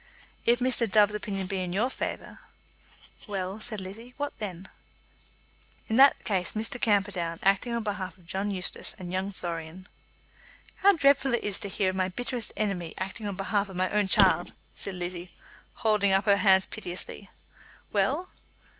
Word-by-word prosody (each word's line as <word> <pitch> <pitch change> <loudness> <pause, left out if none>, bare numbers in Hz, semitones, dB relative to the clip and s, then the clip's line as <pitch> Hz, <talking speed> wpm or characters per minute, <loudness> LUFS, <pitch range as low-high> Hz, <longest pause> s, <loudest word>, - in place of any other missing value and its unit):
"If 240 +1 +5
Mr. 245 -3 +3
Dove's 210 +1 +5
opinion 200 -2 -3
be 190 +1 -3
in 180 -1 -3
your 230 +7 +1
favour - - -5 0.4
" - - -24
"Well," 195 0 -3
said 215 -2 -4
Lizzie, 220 +6 -9
"what 290 0 -3
then?" 190 -3 -5 1.2
"In 220 - +1
that 275 +1 +6
case 190 -5 0
Mr. 225 +3 -3
Camperdown, 195 -6 +1
acting 195 +5 +2
on 230 - -2
behalf 195 -3 -4
of 180 - -22
John 195 +4 -2
Eustace 185 -3 0
and 180 -3 -7
young 190 +2 -2
Florian 170 0 -6 0.4
" - - -25
"How 400 +1 +6
dreadful 275 -5 +4
it - - -3
is 205 -2 -1
to 200 - -4
hear 190 -1 0
of - - -8
my 185 0 +1
bitterest 245 +3 -3
enemy 185 -6 -2
acting 195 +3 -4
on 200 - -3
behalf 200 +1 -1
of 190 - -9
my 185 +1 0
own 210 -1 +2
child!" 185 -3 +4 0.2
said 195 - -4
Lizzie, 175 -1 -5 0.4
holding 210 -4 +2
up 195 +2 +3
her 200 -2 +5
hands 190 -1 +5
piteously. 190 -1 -6 0.6
"Well?" 365 - +1
200 Hz, 170 wpm, -28 LUFS, 185-220 Hz, 1.2 s, that